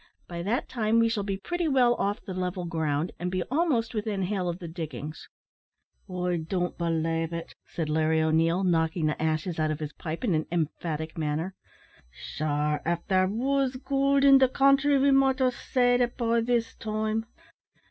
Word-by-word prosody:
By 170 Hz, -1 st, -5 dB
that 210 Hz, +8 st, -1 dB
time 225 Hz, -2 st, 0 dB
we 230 Hz, 0 st, +4 dB
shall 220 Hz, -2 st, -1 dB
be 195 Hz, -1 st, -3 dB
pretty 350 Hz, -, -2 dB
well 255 Hz, -4 st, +4 dB
off 205 Hz, -3 st, -2 dB
the 190 Hz, -, -5 dB
level 180 Hz, 0 st, -3 dB
ground, 160 Hz, -1 st, -1 dB
and 180 Hz, -, -2 dB
be 185 Hz, 0 st, -1 dB
almost 275 Hz, -7 st, +1 dB
within 210 Hz, -3 st, -2 dB
hail 185 Hz, -1 st, -1 dB
of 170 Hz, -, -3 dB
the 175 Hz, -2 st, -8 dB
diggings 155 Hz, -3 st, -7 dB, 0.4 s
" -, -, -42 dB
"I 180 Hz, -1 st, -1 dB
don't 175 Hz, +2 st, -2 dB
belave 165 Hz, -1 st, -1 dB
it," 165 Hz, 0 st, -6 dB
said 165 Hz, -3 st, -3 dB
Larry 160 Hz, +1 st, +2 dB
O'Neil, 165 Hz, +3 st, +2 dB
knocking 165 Hz, -2 st, +1 dB
the 150 Hz, 0 st, -1 dB
ashes 160 Hz, +2 st, -1 dB
out 155 Hz, 0 st, +1 dB
of 155 Hz, 0 st, -2 dB
his 150 Hz, -1 st, -5 dB
pipe 165 Hz, +4 st, -6 dB
in 215 Hz, -7 st, +1 dB
an 155 Hz, -1 st, 0 dB
emphatic 160 Hz, -1 st, -3 dB
manner; 155 Hz, +4 st, -2 dB, 0.6 s
"sure 150 Hz, -, -2 dB
av 170 Hz, +1 st, 0 dB
there 185 Hz, -1 st, +3 dB
was 260 Hz, +5 st, 0 dB
goold 275 Hz, +1 st, +1 dB
in 275 Hz, -1 st, +8 dB
the 260 Hz, -1 st, +4 dB
country 275 Hz, +2 st, +4 dB
we 275 Hz, +1 st, +4 dB
might 270 Hz, 0 st, +4 dB
have 255 Hz, -2 st, +2 dB
seed 245 Hz, 0 st, +1 dB
it 240 Hz, 0 st, 0 dB
by 235 Hz, -1 st, +1 dB
this 235 Hz, 0 st, 0 dB
time." 215 Hz, +1 st, -2 dB
185 Hz, 185 wpm, -27 LUFS, 160-240 Hz, 0.6 s, in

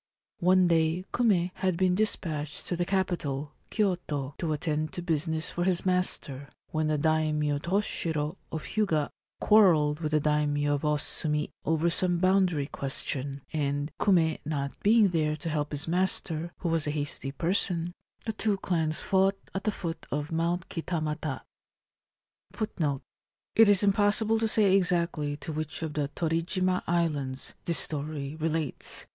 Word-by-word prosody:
One 185 Hz, +1 st, +5 dB
day 165 Hz, +2 st, +2 dB
Kume 190 Hz, -7 st, +2 dB
had 185 Hz, -2 st, -1 dB
been 185 Hz, 0 st, +3 dB
despatched 160 Hz, -7 st, -1 dB
to 175 Hz, -, -2 dB
the 175 Hz, +1 st, 0 dB
capital, 155 Hz, -7 st, -1 dB, 0.2 s
Kyoto, 170 Hz, -9 st, -1 dB
to 165 Hz, -3 st, -1 dB
attend 155 Hz, 0 st, -1 dB
to 175 Hz, -, -5 dB
business 160 Hz, -1 st, -1 dB
for 175 Hz, -, -1 dB
his 180 Hz, -1 st, +1 dB
master, 165 Hz, -7 st, 0 dB, 0.2 s
when 155 Hz, -1 st, 0 dB
the 155 Hz, 0 st, +1 dB
Daimio 150 Hz, -1 st, +1 dB
Toshiro 165 Hz, -3 st, -1 dB, 0.2 s
of 160 Hz, -, -4 dB
Hyuga 165 Hz, -9 st, 0 dB, 0.3 s
quarrelled 160 Hz, -9 st, +5 dB
with 155 Hz, -2 st, -3 dB
the 155 Hz, -, +5 dB
Daimio 145 Hz, -1 st, +1 dB
of 145 Hz, -, -1 dB
Osumi 150 Hz, 0 st, 0 dB
over 160 Hz, +2 st, +2 dB
some 175 Hz, 0 st, +1 dB
boundary 185 Hz, -5 st, +3 dB
question, 140 Hz, 0 st, -3 dB
and, 145 Hz, 0 st, -1 dB
Kume 165 Hz, -6 st, +3 dB
not 140 Hz, -2 st, -2 dB
being 215 Hz, -1 st, +5 dB
there 155 Hz, -3 st, +1 dB
to 160 Hz, +2 st, -4 dB
help 150 Hz, -1 st, -1 dB
his 145 Hz, +1 st, 0 dB
master, 170 Hz, -2 st, 0 dB
who 175 Hz, -, 0 dB
was 165 Hz, -2 st, +1 dB
a -, -, +1 dB
hasty 145 Hz, -2 st, -2 dB
person, 175 Hz, +2 st, 0 dB, 0.3 s
the 220 Hz, -, -1 dB
two 215 Hz, -1 st, +1 dB
clans 160 Hz, -5 st, -1 dB
fought 195 Hz, 0 st, +2 dB, 0.2 s
at 195 Hz, +1 st, -4 dB
the 215 Hz, -, +2 dB
foot 170 Hz, -4 st, -5 dB
of 145 Hz, +2 st, -3 dB
Mount 170 Hz, +2 st, 0 dB
Kitamata. 155 Hz, -4 st, -3 dB, 1.2 s
1 155 Hz, -, -1 dB, 0.5 s
It 225 Hz, -2 st, +7 dB
is 205 Hz, -1 st, +4 dB
impossible 210 Hz, +2 st, +3 dB
to 225 Hz, -, +1 dB
say 205 Hz, -3 st, +4 dB
exactly 170 Hz, -5 st, +1 dB
to 155 Hz, -, -6 dB
which 155 Hz, +1 st, -4 dB
of 155 Hz, -2 st, -3 dB
the 145 Hz, -2 st, -1 dB
Torijima 175 Hz, +3 st, 0 dB
islands 150 Hz, -6 st, -1 dB
this 170 Hz, -2 st, 0 dB
story 145 Hz, +1 st, -3 dB
relates. 160 Hz, -1 st, -2 dB
160 Hz, 150 wpm, -28 LUFS, 150-185 Hz, 1.2 s, It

